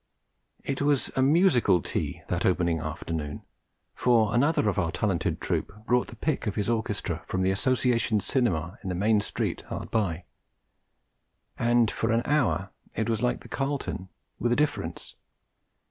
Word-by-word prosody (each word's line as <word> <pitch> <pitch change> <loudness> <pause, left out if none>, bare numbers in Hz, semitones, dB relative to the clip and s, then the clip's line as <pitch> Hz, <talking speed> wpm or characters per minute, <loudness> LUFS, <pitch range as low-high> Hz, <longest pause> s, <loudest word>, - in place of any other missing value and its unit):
It 135 0 -2
was 145 -1 +2
a 130 - +2
musical 135 - +4
tea - - -3
that - - -1
opening 85 -2 +2
afternoon, 80 -1 -4 0.5
for 115 -4 +3
another 130 -1 +3
of 100 - +1
our 80 - 0
talented 95 -3 -1
troupe 105 +1 -3
brought 125 +1 +2
the - - -10
pick 150 -7 -1
of 105 - -1
his 105 - -1
orchestra 105 -7 -2
from 95 0 -1
the 95 - +3
Association 120 0 +2
Cinema 95 - 0
in 95 - -5
the 90 - -1
main 105 +3 +3
street - - -2
hard - - -5
by; 90 -7 0 1.4
and 120 -1 +3
for - - -1
an 115 +1 +2
hour 100 - +1 0.2
it 110 +2 -1
was 110 -1 -1
like 125 0 0
the - - -12
Carlton, 135 -9 -3 0.3
with 120 - +1
a - - +4
difference. 150 +2 -2
110 Hz, 160 wpm, -27 LUFS, 95-125 Hz, 1.4 s, musical